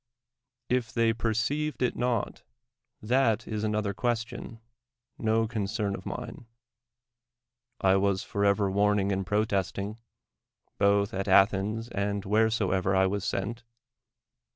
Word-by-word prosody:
If 125 -3 0
they 115 -1 +2
perceived 120 +7 -1
it 125 - +1
not, 120 -3 -1 0.6
that 120 -1 +2
is 110 -1 -3
another 105 -1 0
ques 120 +1 0
tion, 115 0 -9 0.6
no 110 0 +1
concern 105 -2 -2
of 95 - -7
mine. 120 -1 -7 1.3
I 95 0 +4
was 95 -1 +1
forever 100 -1 +1
warning 100 0 +2
and 95 -1 -2
protesting, 105 +1 -1 0.8
both 100 0 +3
at 95 +1 -3
Athens 100 +3 +3
and 100 -1 -2
wheresoever 100 -3 +2
I 95 0 +4
was 100 0 -1
sent. 115 +5 -3
105 Hz, 115 wpm, -28 LUFS, 100-115 Hz, 1.3 s, I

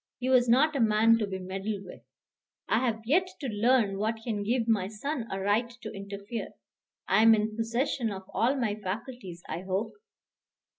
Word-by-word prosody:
He 255 +1 -2
was 250 -2 +4
not 290 +6 +4
a - - 0
man 225 0 +4
to 210 - -1
be 190 -1 -4
meddled 195 +2 -4
with. 180 - -11 0.7
"I 220 - +3
have 230 -3 -1
yet 350 +10 +3
to 275 - -4
learn 215 -2 +2
what 220 +2 0
can 220 -4 -2
give 230 +3 0
my 210 -5 +2
son 230 +4 -4
a 195 - -3
right 205 +5 +1
to - - -5
interfere. 200 +3 -6 0.5
I - - +4
am 225 0 +8
in 215 0 -1
possession 235 +2 -1
of 190 -1 -6
all 245 +5 +2
my 235 -6 0
faculties, 205 -2 -6
I 165 +3 -4
hope." 190 +3 -2
220 Hz, 185 wpm, -29 LUFS, 200-245 Hz, 0.7 s, am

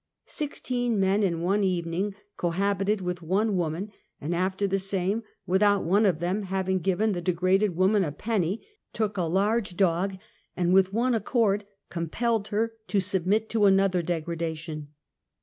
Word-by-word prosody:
Sixteen 245 -6 -2
meii\ 195 +2 +2
i - - +4
n 170 -2 -3
one 195 +4 +1
evening 185 +2 -1 0.2
c^ohabited 195 +3 0
with 180 -1 -3
one 195 +5 +1
woman, 175 +4 -2 0.3
and 155 +4 -3
after 185 +3 0
^ - - +2
the 195 0 0
same, 195 +2 0 0.2
without 200 +2 +3
one 200 +5 +3
of 180 -5 +2
them 180 +5 -1
having 190 -1 -1
given 195 +5 +1
the 175 -3 -2
de 180 - +1
graded 185 +2 +2
woman 190 +3 +3
a 150 - -2
penny, 200 +2 -2 0.3
took 215 -2 -1
a 185 - -1
large 195 +3 0
dog 190 +1 +1 0.4
and, 175 0 +2
with 190 0 +5
one 240 +4 +1
accord, 210 -2 +1 0.3
compelled 215 +6 -1
her 225 +2 -1
to 205 - +1
submit 195 +3 +1
to 220 -2 +3
another 195 -2 +4
deg 165 -2 -2
^ - - -27
radation 160 -2 -4
190 Hz, 170 wpm, -27 LUFS, 175-210 Hz, 0.4 s, with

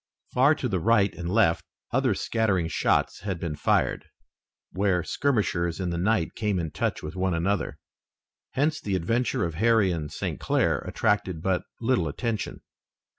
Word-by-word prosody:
Far 140 +5 +5
to 130 - -2
the 95 -6 0
right 100 0 +3
and 85 0 -5
left 95 -6 +3 0.3
other 130 -4 +2
scattering 100 -6 0
shots - - +1
had 95 -2 -4
been 80 -3 -3
fired, - - +1 0.6
where 95 -3 +1
skirmishers 100 - 0
in 90 -2 -1
the 85 - -2
night 95 -2 +1
came 105 -4 -1
in 80 -3 -2
touch 80 - -2
with 75 +3 -6
one 95 -1 0
another. 90 +1 -1 0.8
Hence 150 +3 +1
the 100 -2 -1
adventure 115 +5 0
of 85 - -3
Harry 110 +1 +3
and 75 -3 -3
St. - - -4
Clair - - +1
attracted 95 -5 -1
but 95 -2 0
little 115 -8 +1
attention. 110 - -3
95 Hz, 160 wpm, -26 LUFS, 85-115 Hz, 0.8 s, Far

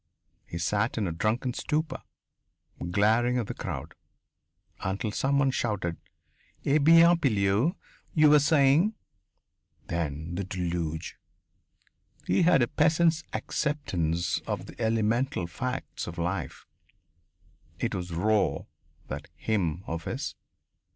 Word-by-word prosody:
He 85 - -5
sat 105 +8 0
in 110 - 0
a - - -2
drunken 110 +9 -1
stupor, 155 +4 -2 0.9
glaring 110 +6 +3
at 120 - 0
the - - -5
crowd, - - -6 0.9
until 100 +4 -2
someone 135 +3 +2
shouted: 100 -9 -2 0.7
"Eh 145 +3 +4
bien, 165 +3 +7
Pilleux 110 - +2 0.4
you 155 -2 +6
were 150 - +8
saying?" 150 +7 +4 0.9
Then 80 -1 -3
the 95 +3 -2
deluge! 85 -3 -3 1.1
He - - +2
had 170 -7 +5
a - - +1
peasant's 160 +2 +2
acceptance 90 - -1
of - - -3
the - - -11
elemental 115 0 +1
facts 125 +10 -4
of 85 0 -7
life 85 -4 -3 1.1
it - - -2
was 90 -1 -4
raw, 105 +5 +1 0.4
that 70 +2 -6
hymn 95 -5 -1
of 80 0 -5
his! - - -3
110 Hz, 115 wpm, -28 LUFS, 85-140 Hz, 1.1 s, were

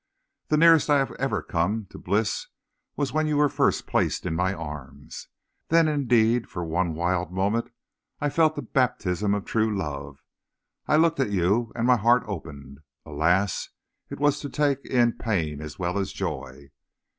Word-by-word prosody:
The 150 - +2
nearest 165 -1 +6
I 145 - +5
have 135 -1 0
ever 135 +1 -1
come 100 +5 -1
to - - -10
bliss 105 +3 -1 0.5
was 145 -2 -2
when 155 0 +1
you 150 -1 0
were 145 0 +4
first - - +1
placed - - 0
in - - -1
my 90 +3 +1
arms. 75 -5 -8 0.4
Then, 165 0 +4
indeed, 120 -5 +2
for 85 -1 -5
one 85 0 -1
wild 85 0 -1
moment, 100 +5 0 0.5
I 145 -1 -1
felt 160 0 +3
the - - -4
baptism 105 - 0
of 100 - -4
true 110 -2 0
love. 70 -4 -6 0.6
I - - +3
looked 165 0 +3
at 135 - +1
you, 100 +5 +1
and 115 0 -1
my 125 0 +5
heart 120 +3 +3
opened. 70 - -8 0.3
Alas! 85 +6 0 0.4
it - - -7
was 145 0 +2
to 145 - -6
take 140 -2 0
in 120 -2 +2
pain 80 -10 -2
as 75 -1 -8
well 90 +2 -1
as 95 - -2
joy. 65 +1 -6
105 Hz, 170 wpm, -25 LUFS, 85-135 Hz, 0.6 s, nearest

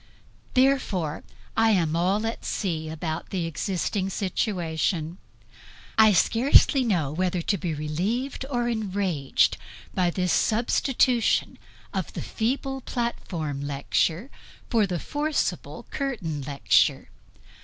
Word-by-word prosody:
Therefore 240 - +1 0.3
I 225 0 +4
am 170 -7 +2
all 190 +6 +1
at 225 - -3
sea 160 -6 -2
about 160 +1 -4
the 180 -3 -2
existing 185 +4 -2
situation; 175 -3 -1 0.8
I 220 -1 +7
scarcely 255 - +4
know 175 - 0
whether 180 +3 0
to 200 - +1
be 170 -3 -2
relieved 190 - -2
or 240 -3 0
enraged 195 - +1 0.4
by 180 -2 +2
this 180 0 0
substitution 240 +1 +2 0.3
of - - -3
the - - -4
feeble 270 +3 -2
platform 170 - -3
lecture 150 - -1 0.4
for 220 -4 +3
the 180 -2 -2
forcible 295 - -2
curtain 205 - -3
lecture. 140 0 +2
190 Hz, 110 wpm, -26 LUFS, 160-235 Hz, 0.8 s, I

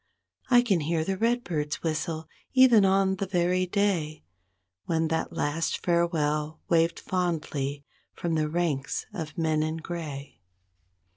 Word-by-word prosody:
I 245 -1 +6
can 200 -8 +2
hear 160 +1 0
a 195 - 0
redbird's 185 -9 -1
whistle, 160 0 -2 0.3
even 250 -6 +7
on 190 0 +3
the 195 - -2
very 180 0 +1
day 180 -6 0 0.6
When 160 -1 0
that 160 0 -1
last 155 +3 -1
farewell 155 -3 +1
waved 165 0 +2
fondly 150 -6 -2 0.3
from 170 -1 -2
the 155 -1 +1
ranks 155 -5 -1
of 155 -4 -6
men 160 -2 +1
in 155 +1 -1
gray. 155 -4 -6
165 Hz, 130 wpm, -27 LUFS, 155-185 Hz, 0.6 s, even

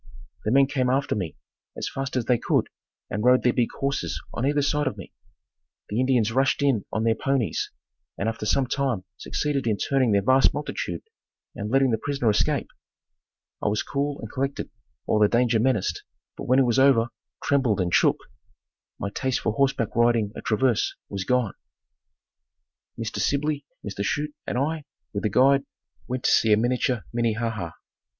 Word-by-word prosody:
The 105 - +1
men 135 +2 +6
came 130 -2 0
after 135 +2 +1
me 90 -7 -3 0.4
as - - -3
fast 135 -1 -4
as 125 -3 0
they 120 -1 +2
could - - +1 0.4
and 105 - -2
rode 125 +1 +5
their 125 - +3
big 120 -2 +1
horses 140 0 -1
on 125 - -1
either 145 0 +2
side 145 0 +1
of 130 - -2
me. - - -10 0.8
The 105 - -1
Indians 125 -4 +2
rushed 135 +3 +2
in 130 -8 +2
on 110 - -1
their 115 0 +3
ponies 135 -2 -1 0.5
and 100 - -1
after 110 -1 -3
some 130 +5 +2
time 130 -6 -1
succeeded 140 +3 -2
in 110 -2 +1
turning 135 -3 +1
that 100 -1 +2
vast 130 0 +4
multitude - - -4 0.5
and 105 +1 -5
letting 135 +1 +3
the 110 - +1
prisoner 140 -4 +1
escape. 105 - 0 0.9
I - - -1
was 105 +1 +1
cool 140 0 -2
and - - -8
collected 135 +1 -3 0.3
while 105 - +2
the 105 - +6
danger 115 0 +2
menaced, 120 -4 0 0.3
but - - -7
when 130 - +4
it 135 - +5
was 120 +1 +2
over, 130 -4 +5 0.3
trembled 130 -8 +2
and 90 -2 0
shook. - - +4 0.8
My 100 - -4
taste 130 +3 -1
for 110 - 0
horseback 135 -4 0
riding 115 -3 +3
at - - -8
Traverse 115 +1 +1
was 100 -1 -4
gone. 125 -4 +1 1.4
Mr. 115 -1 -4
Sibley, 145 0 0 0.2
Mr. 100 0 -3
Chute 150 +7 -1
and - - -1
I, 155 +3 -1 0.3
with 100 +1 -2
a - - +3
guide, 135 +6 +4 0.4
went 130 0 -3
to - - +3
see 110 - +4
a - - +5
miniature 120 0 0
Minnehaha. 115 -6 -1
125 Hz, 175 wpm, -25 LUFS, 110-135 Hz, 1.4 s, men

